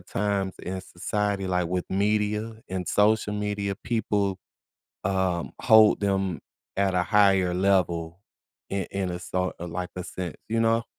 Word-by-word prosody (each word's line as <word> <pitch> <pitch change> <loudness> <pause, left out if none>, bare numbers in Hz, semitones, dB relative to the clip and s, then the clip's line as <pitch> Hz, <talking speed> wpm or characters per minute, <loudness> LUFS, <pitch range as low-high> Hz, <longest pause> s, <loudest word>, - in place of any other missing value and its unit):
times 95 +1 -1
in 95 +1 -4
society, 100 +2 -2
like 90 -1 +1
with 90 +1 -1
media 105 +2 0 0.2
and 95 -1 -3
social 105 0 +3
media, 105 -1 -2
people, 100 -4 0 0.7
um, 95 -3 0
hold 110 -1 +6
them 95 -3 0 0.4
at 95 -1 +2
a 90 - +3
higher 95 -3 +4
level 90 -3 +1 0.5
in 95 -2 -1
in 95 -2 -2
a 90 - -4
so 90 0 -2
or 85 - -4
like 90 +2 -4
a 90 - -3
saint, 90 -1 -5
you 115 +1 +1
know? 115 0 +2
95 Hz, 150 wpm, -26 LUFS, 90-105 Hz, 0.7 s, hold